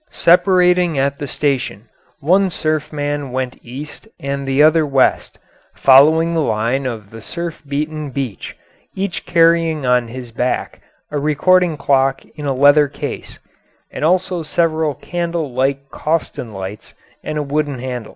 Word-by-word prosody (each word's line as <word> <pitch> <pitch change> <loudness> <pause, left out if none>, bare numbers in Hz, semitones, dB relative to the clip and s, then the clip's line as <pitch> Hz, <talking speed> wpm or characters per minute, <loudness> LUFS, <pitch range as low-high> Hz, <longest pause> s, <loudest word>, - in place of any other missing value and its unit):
Separating 180 -2 +3
at 140 +1 0
the 145 - -4
station, 130 -6 -2 0.3
one 185 +6 +3
surf 155 -2 -2
man 145 -2 -3
went 130 0 -3
east 140 - -9
and 140 0 -4
the 135 +2 +3
other 155 +1 +5
west, 135 -3 +1 0.4
following 155 +5 +5
the 165 - +1
line 120 +2 0
of 110 -5 -6
the 115 0 -10
surf 170 +6 -6
beaten 150 +1 -3
beach, 130 -6 -5 0.4
each 190 -1 -4
carrying 165 -3 +3
on 125 -1 +2
his 120 0 -8
back 125 +2 -2 0.3
a 150 - -1
recording 165 +3 +2
clock 135 -1 +1
in 145 -1 -5
a - - +1
leather 145 +2 +5
case, 140 - -7 0.5
and - - -6
also 180 +1 +1
several 160 -2 0
candle 170 -3 -3
like 135 +2 -1
Coston 155 -7 -2
lights 95 +1 -8 0.3
and 155 - -4
a 150 - -1
wooden 145 -1 -2
handle. 125 -3 -5
145 Hz, 145 wpm, -18 LUFS, 130-165 Hz, 0.5 s, other